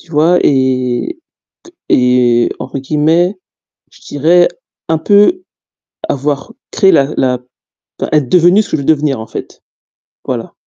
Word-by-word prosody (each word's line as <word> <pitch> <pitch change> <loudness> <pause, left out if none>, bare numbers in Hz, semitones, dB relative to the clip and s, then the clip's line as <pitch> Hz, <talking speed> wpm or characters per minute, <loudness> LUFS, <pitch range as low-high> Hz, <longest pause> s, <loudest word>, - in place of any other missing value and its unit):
Tu 170 - -20
vois? 165 +4 +3
Et 130 - 0 0.5
que 350 - -18 0.2
et, 125 -1 +2
entre 135 - -6
guillemets, 160 +7 +1 0.6
je - - -20
dirais 170 +5 +2 0.4
un 160 - +1
peu, 210 - +3 0.7
avoir 140 - -3 0.2
créé 195 -3 +3
la 140 -1 +2
la 125 -1 0
p 125 - -28 0.7
être 150 -5 +1
devenue 180 +3 +4
ce 205 - -8
que - - 0
je - - -4
veux - - -8
devenir 150 -4 +1
en 110 - -8
fait. - - -9 0.6
Voilà. - - -5
150 Hz, 145 wpm, -13 LUFS, 130-175 Hz, 0.7 s, devenue